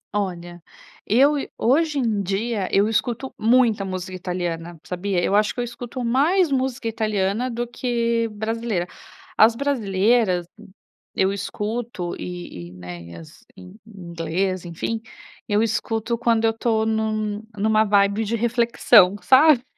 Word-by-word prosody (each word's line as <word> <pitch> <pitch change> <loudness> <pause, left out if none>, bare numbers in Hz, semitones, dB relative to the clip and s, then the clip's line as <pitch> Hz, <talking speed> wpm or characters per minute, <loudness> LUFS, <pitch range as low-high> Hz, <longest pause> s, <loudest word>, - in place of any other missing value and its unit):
Olha, 175 -3 -4 0.5
eu 270 +8 +5 0.2
hoje 295 +5 +2
em 225 -6 0
dia, 200 +1 -2
eu 200 +1 +3
escuto 230 +4 -2
muita 225 -2 +3
música 185 -1 -5
italiana, 175 -2 -4
sabia, 180 0 -2
eu - - 0
acho 210 +1 +2
que - - -5
eu - - 0
escuto 240 +1 -6
mais 300 +8 +2
música 260 -2 -1
italiana 215 +1 -1
do 240 0 -3
que 235 -2 -1
brasileira. 220 -3 -2 0.5
As 225 +1 +5
brasileiras, 220 -7 +1 0.7
eu 190 +1 +2
escuto 210 -1 -4
e 175 - -7
e, - - -14
né, 90 -1 -9
e 85 0 -11
as 80 -1 -13
em 90 0 -12
em 190 -6 -11
inglês 175 +3 -2
enfim, 175 +7 -4 0.5
eu 210 +1 +3
escuto 225 +1 -1
quando 230 -1 +1
eu 225 - +4
estou 225 -1 0
num 215 -1 -1 0.2
numa 215 +1 +3
vibe 200 0 +2
de 220 +2 -1
reflexão, 235 -4 +4
sabe. 265 -1 +6
215 Hz, 140 wpm, -22 LUFS, 185-235 Hz, 0.7 s, sabe